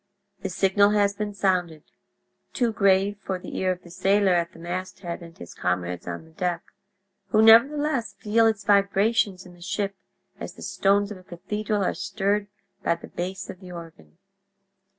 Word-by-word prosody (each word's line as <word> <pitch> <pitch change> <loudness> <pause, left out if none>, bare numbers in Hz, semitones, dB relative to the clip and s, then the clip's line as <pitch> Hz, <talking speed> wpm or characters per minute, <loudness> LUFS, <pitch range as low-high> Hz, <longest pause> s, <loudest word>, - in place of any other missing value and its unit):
The 190 - -3
signal 195 +2 +3
has 200 -1 +3
been 205 0 -4
sounded—too 185 - -3
grave 200 0 +3
for 190 -1 -3
the 180 - -9
ear 185 0 +1
of 180 0 -5
the 175 - -14
sailor 195 +1 +3
at 170 0 +1
the - - -16
masthead 175 +1 -5
and 165 -1 -12
his 85 - -10
comrades 90 -1 -2
on 90 - -5
the 160 - -19
deck—who 190 +4 -4
nevertheless 260 +4 +5
feel 225 +2 +3
its 215 -3 0
vibrations 200 -1 +2
in 180 - -13
the 175 - -18
ship 200 +1 -2 0.4
as - - -7
the - - -11
stones 200 +1 +1
of 200 - -7
a - - -17
cathedral 205 +3 -3
are - - +1
stirred 200 +1 -1 0.3
by - - +1
the 170 - -12
bass 185 +2 -5
of 180 - -9
the 185 -2 -11
organ. 165 -1 -11
195 Hz, 170 wpm, -25 LUFS, 175-205 Hz, 0.4 s, nevertheless